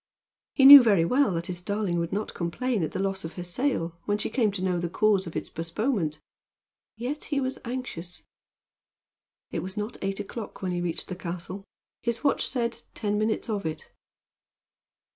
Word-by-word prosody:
He 270 - +5
knew 280 0 +14
very 200 -8 +4
well 265 +7 +3
that 170 0 -2
his 175 0 -3
darling 200 -2 -1
would 170 0 -2
not 210 +2 -2
complain 215 +6 -1
at 155 - -1
the - - -4
loss 195 0 -1
of 160 - -6
her 180 - -6
sail, 175 -4 -1
when 205 0 +1
she 215 - -3
came 225 -4 +2
to 190 - -4
know 180 -2 +1
the 170 0 -2
cause 200 0 +2
of 165 - -8
its - - -3
postponement. 165 - -2 0.8
Yet 255 +6 -4
he 285 -2 0
was 260 -1 -2
anxious. 235 -9 -5 1.3
It - - -2
was 190 +3 -6
not 210 +2 -3
eight 195 0 -2
o'clock 215 0 -7
when 185 - -1
he 175 0 -1
reached 175 -2 -2
the 185 - -3
castle. 180 +2 -6 0.4
His 235 +2 -2
watch 280 - +2
said, 235 -2 -2
ten 210 -1 -1
minutes 215 +1 0
of 210 -3 -2
it. 160 -1 -5
195 Hz, 185 wpm, -27 LUFS, 175-235 Hz, 1.3 s, knew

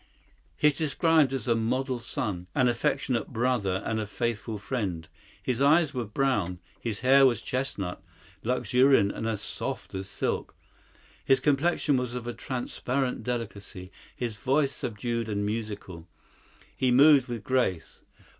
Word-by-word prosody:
He 150 - +5
is 145 - -4
described 160 -2 +3
as 135 -4 -3
a 120 - +4
model 125 +3 -1
son, 100 -6 -3
an 130 - +4
affectionate 120 0 0
brother 115 -6 0
and 110 -1 -1
a 105 - -3
faithful 115 -1 -3
friend. 100 -7 -3 0.4
His 125 0 -1
eyes 150 +2 +4
were 125 -3 -2
brown; 105 -6 0 0.2
his 110 -4 -3
hair 135 +2 +6
was 120 - +1
chestnut, 115 -9 -3 0.4
luxuriant 125 -2 +3
and 110 - -4
as 110 -3 -2
soft - - -4
as 95 0 -5
silk. - - -2 0.7
His 135 0 +4
complexion 145 +1 +2
was 125 -1 -2
of 120 -1 -4
transparent 130 +1 -2
delicacy; 100 -6 -5 0.2
his 115 -4 -4
voice 135 +6 +1
subdued 115 -2 -3
and 105 -1 -1
musical. 105 -6 -5 0.7
He 130 - +1
moved 140 +1 +6
with 120 -4 -5
grace. 120 -9 -1
120 Hz, 140 wpm, -28 LUFS, 105-130 Hz, 0.7 s, hair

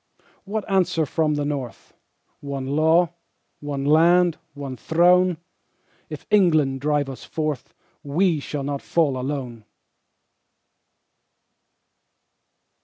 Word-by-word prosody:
What 210 +1 -4
answer 180 -5 +1
from 155 0 0
the 145 0 -1
North? 140 -5 -5 0.5
One 140 -2 -5
Law, 160 +5 +2 0.5
one 140 -2 -4
Land, 170 +3 +4 0.2
one 140 -2 -6
Throne. 175 +4 +3 0.7
If 150 -2 -8
England 155 -10 +3
drive 145 -1 0
us 135 -2 -8
forth 155 -5 -4 0.3
We 160 +3 +1
shall 140 0 -5
not 140 0 -3
fall 155 -6 +1
alone! 125 -3 -5
150 Hz, 100 wpm, -23 LUFS, 140-170 Hz, 0.7 s, Land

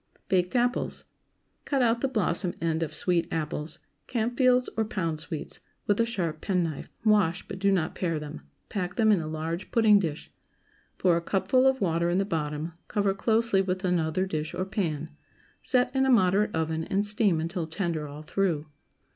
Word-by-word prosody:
BAKED 180 +3 +1
APPLES. 245 0 0 0.6
✠ - - -43
Cut 275 -3 +1
out 235 0 +2
the 270 - +2
blossom 190 -7 0
end 165 -1 0
of 165 - -2
sweet 175 -2 +1
apples—Campfields 230 - 0
or 225 - +1
Pound 165 -7 -2
Sweets—with 165 +5 -4
a 230 - +3
sharp 170 -9 -2
penknife; 175 -6 -1 0.2
wash, 200 -5 +3
but 190 - -6
do 200 0 +3
not 175 -4 +1
pare 165 -3 -1
them; 150 0 -7 0.3
pack 180 -4 -3
them 220 -2 +4
in 200 - +4
a 155 - -4
large 160 +3 -4
pudding 215 -3 +5
dish; 160 -6 -4 0.6
pour 175 -2 +3
a - - -1
cupful 255 +9 +2
of 265 -1 +2
water 170 -2 +1
in 175 - +1
the 195 - +2
bottom, 155 -2 -3
cover 200 -2 +1
closely 220 0 +2
with 185 0 -2
another 180 0 +1
dish 155 -4 -3
or 185 - -1
pan; 160 -6 -2 0.5
set 250 0 +1
in 265 - +3
a 265 - +2
moderate 205 -3 +3
oven, 160 0 -1
and 200 +2 0
steam 205 -5 +2
until 165 +1 -3
tender 160 -3 -2
all 145 +2 -9
through. 165 -2 0
185 Hz, 175 wpm, -27 LUFS, 160-210 Hz, 0.6 s, pudding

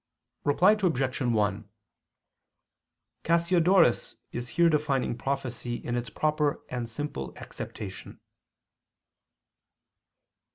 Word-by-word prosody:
Reply 175 +8 +5
Obj. 155 -11 0
1: 105 -4 0 1.5
Cassiodorus 170 -3 +3 0.2
is 120 0 -5
here 170 +5 +4
defining 145 -6 +1
prophecy 130 -2 -3
in 120 0 -4
its 120 -2 -3
proper 150 +3 0
and 120 -2 -4
simple 115 - -5
acceptation. - - -8
135 Hz, 80 wpm, -28 LUFS, 120-160 Hz, 1.5 s, Reply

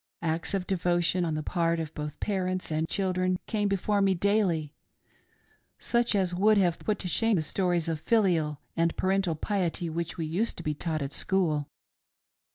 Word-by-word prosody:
Acts 165 +3 -1
of 185 -2 -2
devotion 175 -1 +1
on 160 -2 -1
the 155 - -3
part 170 -1 0
of 160 -1 -4
both 150 0 -6
parents 185 -3 -2
and 155 +1 -1
children 185 -1 +1
came 210 -2 0
before 200 +1 +1
me 195 -1 +3
daily 175 -6 +1 1.0
such 235 -2 +1
as 185 -3 +1
would 210 +4 +4
have 175 -4 +2
put 210 -2 -1
to 185 - -4
shame 225 +5 +2
the 160 - +1
stories 175 0 0
of 160 -2 -1
filial 175 -10 +2 0.2
and 165 0 +1
parental 190 -3 +1
piety 175 -1 -1
which 170 +2 -4
we 165 - -2
used 180 +9 -1
to - - -6
be 155 - -1
taught 155 0 -2
at 140 +1 -5
school. 160 -7 +1
175 Hz, 175 wpm, -28 LUFS, 160-195 Hz, 1.0 s, would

